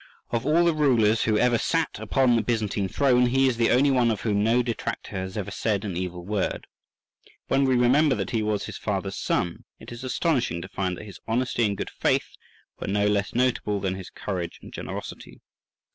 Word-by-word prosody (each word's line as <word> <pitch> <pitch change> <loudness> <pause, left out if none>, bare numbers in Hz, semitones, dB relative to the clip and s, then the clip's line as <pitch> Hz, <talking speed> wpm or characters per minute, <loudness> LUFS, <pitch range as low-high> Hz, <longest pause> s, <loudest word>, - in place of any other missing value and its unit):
Of 120 +3 -1
all 165 +3 +4
the 170 - +3
rulers 120 -8 +3
who 110 -1 +2
ever 120 0 +3
sat 165 -2 -1
upon 130 -3 +2
the 115 - +3
Byzantine 105 -3 -1
throne, 125 +2 +3
he 135 +2 +3
is 125 -3 0
the 115 -1 +3
only 135 +3 +4
one 125 -3 +3
of 110 -3 -1
whom 105 -2 +1
no 120 +3 +3
detractor 115 -2 -4
has 95 +1 -4
ever 100 - -4
said 105 -2 -1
an 95 -4 -4
evil 90 -1 -4
word. 105 -1 -2 0.8
When 135 +1 +3
we 130 -1 +3
remember 130 +4 +4
that - - -3
he 115 - 0
was 105 -1 -1
his - - -7
father's - - -2
son, 85 - -1 0.2
it - - -11
is 120 +1 -8
astonishing 130 - 0
to - - -7
find 90 -2 -3
that - - -9
his 100 -5 -11
honesty 120 0 +1
and 100 -1 -3
good - - -4
faith - - 0 0.5
were - - -5
no 100 +1 +1
less 105 0 0
notable 120 -5 +1
than 95 -1 -1
his 95 -1 -8
courage 90 -4 -5
and - - -11
generosity. - - -7
115 Hz, 205 wpm, -25 LUFS, 100-130 Hz, 0.8 s, all